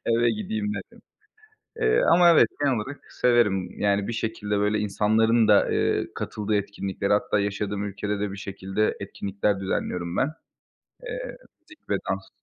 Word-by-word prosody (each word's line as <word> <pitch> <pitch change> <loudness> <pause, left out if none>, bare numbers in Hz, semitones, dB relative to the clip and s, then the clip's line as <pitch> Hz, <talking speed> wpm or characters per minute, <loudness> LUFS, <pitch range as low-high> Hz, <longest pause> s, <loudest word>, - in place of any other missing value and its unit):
eve 115 0 +3
gideyim 210 0 -3
derim. - - -9 0.8
Eee, 450 +2 +2
ama 175 -1 +7
evet, 165 - +6
genel 140 -3 +2
olarak 135 +7 -5
severim. 105 -7 +2
Yani 100 0 +1
bir - - -2
şekilde 110 -2 -2
böyle 105 +1 +1
insanların 110 +2 +2
da, 105 - +5
eee, - - +1
katıldığı 105 0 -3
etkinliklere 100 0 -2
hatta 105 0 +2
yaşadığım 100 0 -2
ülkede 105 0 -3
de 105 -1 -2
bir 100 - -7
şekilde 100 +1 -2
etkinlikler 100 0 -2
düzenliyorum 90 -2 -2
ben. 140 - +2 0.7
Eee, - - -6 0.2
müzik 315 0 -20
ve - - +2
dans. - - -3
105 Hz, 150 wpm, -25 LUFS, 100-120 Hz, 0.8 s, ama